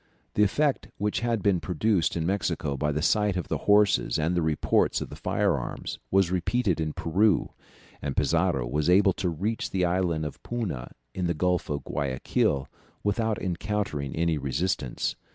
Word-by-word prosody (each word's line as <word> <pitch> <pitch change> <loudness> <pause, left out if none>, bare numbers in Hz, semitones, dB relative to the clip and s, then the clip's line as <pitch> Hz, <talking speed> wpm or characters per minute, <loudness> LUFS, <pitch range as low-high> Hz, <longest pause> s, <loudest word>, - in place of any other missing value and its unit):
The - - +1
effect 140 +8 +2
which 105 0 0
had 115 -4 -1
been 95 -3 +3
produced 90 +1 +1
in 80 - -1
Mexico 85 -6 -1
by 75 +2 0
the 75 +1 -2
sight 105 -1 +2
of 90 - -4
the - - -1
horses 100 -11 +4
and 80 +3 0
the 90 - +1
reports 80 -2 +2
of - - -5
the - - -7
fire - - +1
arms - - -5
was 95 -2 +3
repeated 95 0 +1
in 80 -1 -1
Peru, 95 +3 +2 0.5
and 70 -1 -4
Pizarro 65 -3 +2
was 75 +7 0
able 95 +1 +5
to 90 - -1
reach 100 +8 -2
the 90 -2 +1
Island 85 -3 0
of 75 - -7
Puna 105 - -4 0.2
in 90 -2 -1
the 85 - 0
Gulf 90 +2 0
of 70 -1 -2
Guayaquil 70 -1 0 0.4
without 110 +2 0
encountering 90 -6 -2
any 80 -1 +1
resistance. 70 0 -1
90 Hz, 170 wpm, -27 LUFS, 75-100 Hz, 0.5 s, able